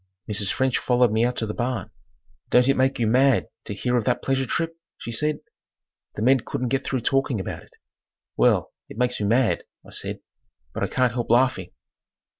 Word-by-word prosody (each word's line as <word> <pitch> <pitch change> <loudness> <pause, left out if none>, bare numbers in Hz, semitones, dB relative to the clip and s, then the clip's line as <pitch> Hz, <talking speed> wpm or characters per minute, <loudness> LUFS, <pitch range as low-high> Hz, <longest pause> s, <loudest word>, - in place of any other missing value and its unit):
Mrs. 100 -2 -1
French 130 -1 +1
followed 125 -2 +3
me 110 +1 +2
out 125 +1 +1
to 110 - -2
the 105 - -4
barn. 120 -5 -3 0.6
"Don't 125 0 +5
it 135 - +4
make 130 +1 +2
you 120 - +1
mad 130 +3 +4 0.2
to 105 - -4
hear 125 +4 0
of 120 - 0
that - - 0
pleasure 135 -1 0
trip?" 165 -1 -2 0.2
she 115 - -7
said. 150 +6 0 0.7
The 105 - -3
men 130 +2 +5
couldn't 125 +2 -3
get 135 +2 0
through 130 -2 -2
talking 135 -2 +1
about 95 - -5
it. - - -21 0.6
"Well, - - +2 0.2
it - - -10
makes 125 -2 0
me 100 - +1
mad," 120 +2 +2 0.2
I - - -14
said, - - -3 0.5
"but - - -5
I - - +1
can't 125 -3 +1
help 120 -1 -3
laughing." 120 -6 +2
125 Hz, 200 wpm, -24 LUFS, 115-130 Hz, 0.7 s, Don't